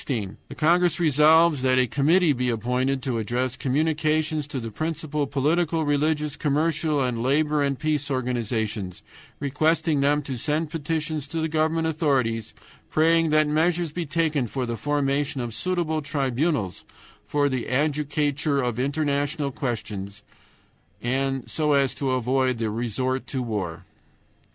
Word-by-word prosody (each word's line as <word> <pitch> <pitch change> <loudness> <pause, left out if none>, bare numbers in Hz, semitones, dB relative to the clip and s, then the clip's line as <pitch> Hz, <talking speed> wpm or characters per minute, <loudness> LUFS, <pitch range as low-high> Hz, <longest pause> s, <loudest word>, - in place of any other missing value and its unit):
The 110 -8 -5
congress 175 +2 +3
resolves 155 -1 +5
that 130 0 +3
a 130 - +4
committee 150 - +3
be 125 -1 -1
appointed 125 +4 0
to 125 -4 -1
address 120 +3 -1
communications 155 +1 0
to 140 -2 -4
the 115 -2 -6
principal 150 +1 -2
political, 155 +4 +1
religious, 150 0 0
commercial, 155 0 +1
and 120 -2 -1
labor 150 +4 +2
and 140 -1 0
peace 150 -1 -1
organizations, 110 -7 -2 0.4
requesting 150 +1 +1
them 145 +1 +2
to 135 -2 -4
send 150 +4 -1
petitions 155 -2 -3
to 165 - -5
the 160 - 0
governmental 160 +1 +1
authorities 130 -8 0 0.3
praying 165 +1 +3
that 155 0 +4
measures 165 +2 +1
be 170 0 -4
taken 150 -4 0
for 130 +3 -3
the 115 -1 -3
formation 145 +1 0
of 120 -2 -4
suitable 170 0 -1
tribunals 140 - -1 0.4
for 145 -1 +2
the 130 -4 -2
adjudicature 145 +1 0
of 120 -1 -3
international 145 +1 0
questions 105 -6 -5 1.2
so 150 -2 0
as 140 -2 +2
to 135 - -2
avoid 130 0 +1
the 110 -2 -1
resort 120 +3 -2
to 130 -2 -3
war. 100 -8 -4
145 Hz, 135 wpm, -25 LUFS, 125-155 Hz, 1.2 s, resolves